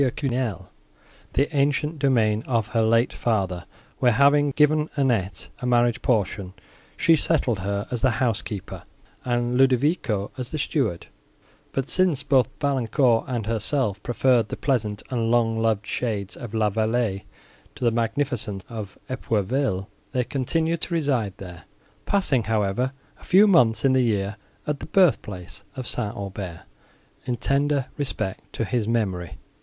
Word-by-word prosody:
Quesnel 125 - -1 0.6
the 145 +2 0
ancient 145 +2 +1
domain 115 -6 +2
of 115 -4 0
her 115 -1 +1
late 115 +2 +3
father, 95 -6 -1 0.3
where, 125 -2 +4
having 145 +3 +4
given 150 +2 +3
Annette 115 -9 0
a 125 - -3
marriage 120 0 +2
portion, 100 -5 0 0.4
she 165 - +5
settled 140 -8 +1
her 100 +2 -2
as 120 -2 -2
the 130 - +4
housekeeper, 110 -5 -2 0.4
and 120 0 0
Ludovico 130 - +2
as 125 -1 -3
the 155 - -3
steward; 130 - -1 0.7
but, 135 0 -2
since 180 -7 +2
both 135 -3 +3
Valancourt 130 -3 +2
and 120 -5 -2
herself 110 -1 0
preferred 120 -1 +2
the - - -4
pleasant 110 -7 -1
and 115 -3 0
long 115 -1 +2
loved 110 -2 +1
shades 105 -5 -3
of 115 -2 -7
La 105 -2 +2
Vallée 110 -2 0 0.5
to - - -8
the 120 - +4
magnificence 115 -3 -1
of 105 -5 -7
Epourville, 115 -3 -1 0.3
they 125 - +1
continued 160 +6 -1
to 170 - -2
reside 130 - 0
there, 90 -3 -10 0.4
passing, 145 - +2
however, 110 +3 0 0.3
a - - -19
few 195 +3 +6
months 135 - +4
in 135 - +4
the 130 - +4
year 105 -3 0 0.3
at 150 -1 -2
the - - -7
birth 185 -6 +4
place 95 +1 -8
of 130 - -5
St. 105 -3 -3
Aubert, 95 -4 -6 0.6
in 125 -2 -1
tender 140 +2 +1
respect 110 -9 -4
to 115 - -2
his 115 -2 -1
memory. 95 -7 -1
120 Hz, 150 wpm, -24 LUFS, 105-135 Hz, 0.7 s, few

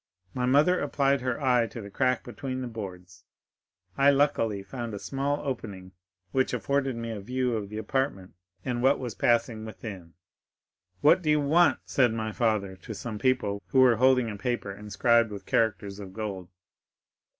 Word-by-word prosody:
My 125 -1 -1
mother 150 +8 +4
applied 140 -1 +1
her 125 -1 -2
eye 125 -4 +3
to 115 - -9
the 100 -2 -9
crack 125 +3 +1
between 130 +2 -5
the 125 - -4
boards; 90 -5 -8 0.8
I 140 +1 +6
luckily 135 -8 +2
found 115 +1 -6
a - - -6
small 140 +4 -2
opening 105 -9 -5 0.4
which 130 -1 +1
afforded 135 +3 0
me 115 0 -4
a 110 - -5
view 125 +3 -1
of 105 -3 -4
the 105 - -6
apartment 110 -4 -2 0.3
and 120 -2 -1
what 135 +3 +4
was 125 -4 -5
passing 115 -1 +1
within. 100 -6 -9 0.9
'What 150 +5 +5
do 155 - -1
you 150 0 +4
want?' 160 +5 +3
said 125 -4 +2
my 110 -1 -2
father 105 -4 0
to 110 +4 -8
some 110 0 -6
people 105 -6 0
who 130 - +4
were 125 -3 +5
holding 125 -1 +3
a 105 - -7
paper 120 -1 -2
inscribed 105 +3 +2
with 100 -2 -8
characters 105 -3 0
of 95 -2 -9
gold. 100 -5 -5
115 Hz, 170 wpm, -27 LUFS, 105-130 Hz, 0.9 s, I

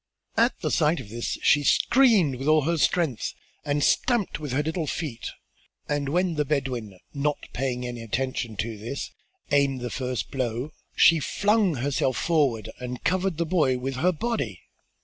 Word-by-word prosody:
At 235 +3 +2
the - - -1
sight 155 0 +2
of 115 -6 -9
this 120 +2 -3
she 145 - +5
screamed 220 - +4
with 135 +3 -4
all 155 -1 +5
her 170 +3 +1
strength 150 -6 +1 0.3
and 145 -1 0
stamped 240 -10 +1
with 150 -3 -5
her 140 +4 +1
little 160 +1 -2
feet, 140 -7 -4 0.6
and 145 -1 -1
when 180 +3 +1
the 150 -1 +1
Bedouin, 130 -9 -2 0.2
not 145 0 0 0.2
paying 125 -1 -2
any 120 -1 -5
attention 120 0 -2
to 110 0 -3
this, 115 +6 -5 0.4
aimed 140 -2 +2
the 125 -1 -4
first 130 -2 -3
blow, 130 +2 -2 0.2
she 165 -1 +6
flung 205 +2 +2
herself 130 0 0
forward 140 -10 +1
and 125 0 -6
covered 185 -2 0
the 170 - 0
boy 155 -7 +2
with 130 +1 -4
her 175 +7 +3
body. 180 - -3
140 Hz, 170 wpm, -26 LUFS, 125-165 Hz, 0.6 s, she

